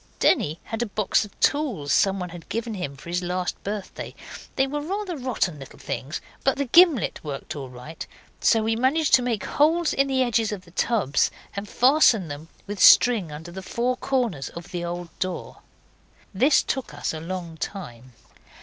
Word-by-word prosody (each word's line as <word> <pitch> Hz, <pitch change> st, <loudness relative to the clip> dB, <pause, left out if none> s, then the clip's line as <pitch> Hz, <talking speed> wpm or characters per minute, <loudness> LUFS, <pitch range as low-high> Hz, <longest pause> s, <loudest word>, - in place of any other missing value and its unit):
Denny 155 Hz, +3 st, +2 dB
had 225 Hz, +1 st, -4 dB
a 240 Hz, -, 0 dB
box 210 Hz, +1 st, +1 dB
of 205 Hz, -, -17 dB
tools 245 Hz, -, +1 dB
someone 195 Hz, -2 st, +2 dB
had 170 Hz, -1 st, -11 dB
given 230 Hz, 0 st, -3 dB
him 145 Hz, -9 st, -5 dB
for 140 Hz, -, -13 dB
his 175 Hz, +1 st, -1 dB
last 180 Hz, 0 st, -3 dB
birthday; 205 Hz, -1 st, -5 dB, 0.4 s
they 265 Hz, -, +3 dB
were 295 Hz, +2 st, -3 dB
rather 380 Hz, +3 st, -3 dB
rotten 240 Hz, -, -1 dB
little 135 Hz, -, -11 dB
things, 145 Hz, +5 st, -5 dB, 0.2 s
but 270 Hz, -, +2 dB
the 280 Hz, -, 0 dB
gimlet 320 Hz, -, +4 dB
worked 145 Hz, -1 st, -6 dB
all 135 Hz, -3 st, -6 dB
right, 125 Hz, +6 st, -9 dB, 0.3 s
so 225 Hz, -1 st, +3 dB
we 225 Hz, +1 st, +1 dB
managed 275 Hz, +6 st, +1 dB
to 255 Hz, -, +8 dB
make 240 Hz, -4 st, -1 dB
holes 320 Hz, +3 st, +2 dB
in 275 Hz, 0 st, +2 dB
the 265 Hz, -1 st, +2 dB
edges 230 Hz, -3 st, +1 dB
of 200 Hz, -3 st, -6 dB
the 170 Hz, -, -17 dB
tubs 185 Hz, -, +1 dB, 0.3 s
and 200 Hz, 0 st, -5 dB
fasten 245 Hz, -, +4 dB
them 145 Hz, +2 st, -7 dB, 0.2 s
with 205 Hz, -1 st, -6 dB
string 220 Hz, -10 st, +6 dB
under 160 Hz, +3 st, -8 dB
the 190 Hz, +2 st, -7 dB
four 240 Hz, +6 st, -1 dB
corners 245 Hz, -, -1 dB
of 170 Hz, 0 st, -10 dB
the 175 Hz, -1 st, -3 dB
old 175 Hz, 0 st, -4 dB
door. 185 Hz, -1 st, -4 dB, 0.8 s
This 265 Hz, +9 st, +4 dB
took 265 Hz, -, -3 dB
us -, -, -2 dB
a 160 Hz, -, -5 dB
long 170 Hz, -1 st, -5 dB
time. 130 Hz, -, -7 dB
200 Hz, 185 wpm, -24 LUFS, 170-255 Hz, 0.8 s, to